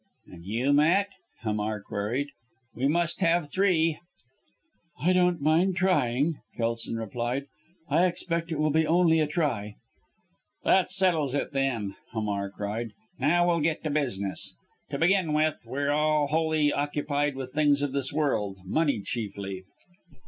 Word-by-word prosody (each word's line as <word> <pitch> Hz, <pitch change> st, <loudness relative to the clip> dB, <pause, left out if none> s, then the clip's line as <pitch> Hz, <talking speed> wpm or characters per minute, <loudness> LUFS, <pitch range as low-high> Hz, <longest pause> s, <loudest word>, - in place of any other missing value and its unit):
"And 85 Hz, -1 st, -13 dB
you, 120 Hz, +8 st, +1 dB
Matt?" 170 Hz, +8 st, +4 dB, 0.3 s
Hamar 105 Hz, -1 st, -1 dB
queried. 110 Hz, +8 st, -3 dB, 0.4 s
"We 130 Hz, +3 st, 0 dB
must 170 Hz, +4 st, 0 dB
have 165 Hz, -4 st, +2 dB
three." 165 Hz, -5 st, +2 dB, 1.0 s
"I 180 Hz, +4 st, +3 dB
don't 180 Hz, -2 st, +3 dB
mind 170 Hz, +5 st, +3 dB
trying," 150 Hz, -5 st, +1 dB, 0.2 s
Kelson 115 Hz, 0 st, -2 dB
replied. 120 Hz, +4 st, -3 dB, 0.4 s
"I 180 Hz, +2 st, +4 dB
expect 170 Hz, -1 st, -3 dB
it 160 Hz, -, -1 dB
will 155 Hz, 0 st, +2 dB
be 160 Hz, +1 st, +2 dB
only 165 Hz, -1 st, +4 dB
a 155 Hz, -, +2 dB
try." 130 Hz, -10 st, -1 dB, 0.9 s
"That 190 Hz, -1 st, +4 dB
settles 170 Hz, -8 st, +1 dB
it, -, -, -1 dB
then!" 125 Hz, -8 st, -1 dB, 0.2 s
Hamar 100 Hz, -3 st, -2 dB
cried. 105 Hz, +4 st, -4 dB, 0.3 s
"Now, 175 Hz, +3 st, +3 dB
we'll 170 Hz, -1 st, +2 dB
get 160 Hz, +1 st, 0 dB
to 155 Hz, -, -1 dB
business. 100 Hz, -10 st, -2 dB, 0.3 s
To 140 Hz, -, -3 dB
begin 170 Hz, 0 st, +2 dB
with 155 Hz, 0 st, +1 dB
we're 140 Hz, +1 st, -1 dB
all 150 Hz, 0 st, +2 dB
wholly 155 Hz, 0 st, +1 dB
occupied 145 Hz, 0 st, -1 dB
with 130 Hz, -1 st, -6 dB
things 145 Hz, -1 st, +3 dB
of 145 Hz, -, -1 dB
this 135 Hz, -1 st, -1 dB
world 120 Hz, -10 st, 0 dB
money 140 Hz, -, +1 dB
chiefly!" 100 Hz, -3 st, -5 dB
145 Hz, 140 wpm, -27 LUFS, 120-165 Hz, 1.0 s, Matt